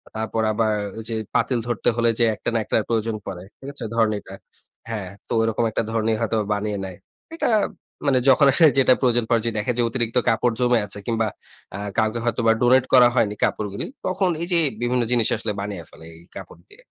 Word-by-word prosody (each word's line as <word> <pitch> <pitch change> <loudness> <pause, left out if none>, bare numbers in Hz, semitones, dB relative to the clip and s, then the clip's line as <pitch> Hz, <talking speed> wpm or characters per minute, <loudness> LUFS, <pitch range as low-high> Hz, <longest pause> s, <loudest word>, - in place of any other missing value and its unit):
তারপর 110 0 -2
আবার 110 0 +1 0.3
যে 115 - -3 0.2
পাতিল 125 -3 +1
ধরতে 120 -1 0
হলে 120 0 +2
যে 120 - +4
একটা - - -3
ন্যাকড়ার 110 0 0
প্রয়োজন 115 -1 0
পড়ে। 95 -2 -6 0.2
ঠিক 135 - -10
আছে 135 - -8
ধরেন 115 -2 +3
এটা 95 - -13 0.6
হ্যাঁ, 105 -5 -4 0.2
তো - - -16
ওরকম 115 0 0
একটা - - 0
ধরণী 110 0 +1
হয়তো 115 0 0
বা 105 - -4
বানিয়ে 105 0 -2
নেয়। 95 -2 -8 0.4
এটা - - 0 0.6
মানে 135 -3 +3
যখন 140 +2 +6
আসলে 160 +3 +6
যেটা 130 -1 +6
প্রয়োজন 120 -2 +2
পড়ে 115 -1 +1
দেখে 105 +4 0
যে 120 - +2
অতিরিক্ত 120 0 -2
কাপড় 115 +1 +2
জমে 120 -1 +3
আছে 100 0 -5
কিংবা 115 -1 0 0.5
আ - - -4 0.2
কাউকে 110 +1 +1
হয়তো 120 0 0
বা 115 - +7
ডোনেট 125 +1 +4
করা 125 -1 +8
হয়নি 105 -3 +2
কাপড়গুলি 100 -2 -1 0.2
তখন 185 0 +1
এই 170 - -2
যে 170 - +5 0.2
বিভিন্ন 120 0 +1
জিনিস 120 -3 +2
আসলে - - -3
বানিয়ে 100 -4 -5
ফেলে 80 - -15
এই 85 - -16
কাপড় 85 - -11
দিয়ে। - - -18
115 Hz, 200 wpm, -22 LUFS, 110-125 Hz, 0.6 s, করা